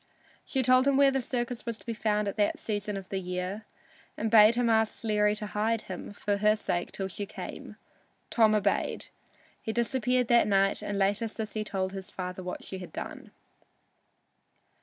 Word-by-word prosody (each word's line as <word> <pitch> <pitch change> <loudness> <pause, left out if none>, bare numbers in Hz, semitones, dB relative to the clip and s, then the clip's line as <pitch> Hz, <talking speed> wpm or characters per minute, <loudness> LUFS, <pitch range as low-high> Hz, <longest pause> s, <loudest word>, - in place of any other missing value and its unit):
She 265 -2 -1
told 255 +2 +5
him 275 -1 +4
where 280 -1 +6
the 270 0 0
circus 240 -1 -3
was 230 -2 -4
to - - -18
be 230 - -2
found 210 -1 0
at 200 - -2
that 205 -1 +2
season 205 -1 -3
of 190 -1 -8
the 195 - -2
year, 180 +3 -4 0.5
and 220 0 -1
bade 220 0 +8
him 245 0 +2
ask 220 -1 +3
Sleary 210 -2 +1
to 210 - -5
hide 215 +2 0
him 185 +1 -7
for 205 0 -1
her 210 +1 +4
sake 180 -4 -2
till 195 - -3
she 200 +2 -5
came. - - -8 0.6
Tom 220 -2 +5
obeyed. 205 -1 0 0.5
He 220 - -3
disappeared 250 +1 +1
that 235 -3 +5
night, 195 -1 +3
and 205 - -3
later 200 +3 +1
Sissy 215 -1 -4
told 190 -2 -2
his 190 -1 -6
father 180 0 -5
what 180 0 -6
she 190 - -6
had 180 - -9
done. - - -7
210 Hz, 185 wpm, -29 LUFS, 195-230 Hz, 0.6 s, bade